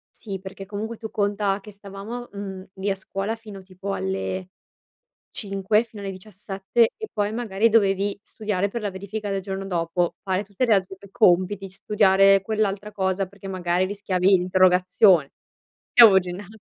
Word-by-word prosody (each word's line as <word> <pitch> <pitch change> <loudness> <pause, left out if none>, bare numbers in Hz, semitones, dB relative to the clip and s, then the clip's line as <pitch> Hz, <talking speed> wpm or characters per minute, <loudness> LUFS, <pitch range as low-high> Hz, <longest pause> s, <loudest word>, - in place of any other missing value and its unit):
Sì, 195 -4 -6
perché 195 0 -9
comunque 215 +3 -5
tu 220 -1 -8
conta 205 -1 0
che 210 - -12
stavamo, 200 +4 -8
mhmm, 195 -2 -7
lì 195 +1 -2
a - - +1
scuola 195 +3 -4
fino 210 -4 -11
tipo 190 +1 -6
alle 95 -1 -3 0.8
5 200 +2 0
fino 215 -3 -11
alle 195 - -4
17 195 +3 -1
e 435 -1 -6
poi 205 -1 0
magari 225 -2 +1
dovevi 200 -2 +2
studiare 205 -2 -2
per 235 +4 -5
la 205 -2 -2
verifica 200 +2 -5
del 195 -1 -2
giorno 195 0 -5
dopo, 175 -1 -1
fare 190 0 -1
tutte 200 +4 -2
le 230 -4 +4
altre 190 0 -1 0.2
compiti, 190 0 +3
studiare 195 0 +4
quell'altra 210 -1 -1
cosa 190 0 -1
perché 200 +1 -13
magari 180 -1 0
rischiavi 190 -2 -2
l'interrogazione. 185 -3 +4 0.6
Io 235 - +10
avevo 195 -3 +8
ginna 180 +2 -7
195 Hz, 160 wpm, -24 LUFS, 185-210 Hz, 0.8 s, Io